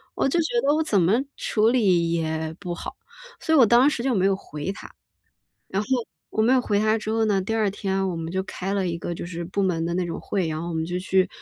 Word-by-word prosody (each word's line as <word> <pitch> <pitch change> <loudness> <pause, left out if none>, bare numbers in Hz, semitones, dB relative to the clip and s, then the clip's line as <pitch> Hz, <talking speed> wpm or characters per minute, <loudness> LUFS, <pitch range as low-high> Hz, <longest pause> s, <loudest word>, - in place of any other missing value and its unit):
我 - - +1
就 340 +5 +1
觉 315 - 0
得 290 -6 +3
我 315 - +1
怎 205 - +2
么 180 +5 +3 0.2
处 220 0 +2
理 185 -9 +3
也 160 -1 -2
不 180 -3 -4
好， - - -7 0.4
所 320 - 0
以 - - +6
我 250 - +8
当 240 +6 +5
时 245 -5 -3
就 265 -2 +1
没 190 - +2
有 195 0 +3
回 150 -1 -5
他。 - - -11 0.8
然 195 +2 -1
后 - - -8 0.4
我 220 - 0
没 240 +4 +4
有 255 - +4
回 205 -4 0
他 215 +1 +3
之 215 - -4
后 225 0 +2
呢， 200 -2 +2
第 225 +4 -2
2 215 -3 +2
天 195 -1 -1
我 180 - -2
们 165 0 -4
就 190 0 0
开 190 0 -5
了 195 -2 0
一 170 - -2
个 170 - -4
就 - - -6
是 170 -1 -5
部 190 +4 -2
门 165 -3 0
的 170 - -2
那 180 0 0
种 170 - -4
会， 185 -5 -1
然 155 0 -3
后 170 - -4
我 170 - -4
们 160 0 -1
就 180 +1 -2
去， 185 0 +2
190 Hz, 290 characters per minute, -24 LUFS, 170-220 Hz, 0.8 s, 我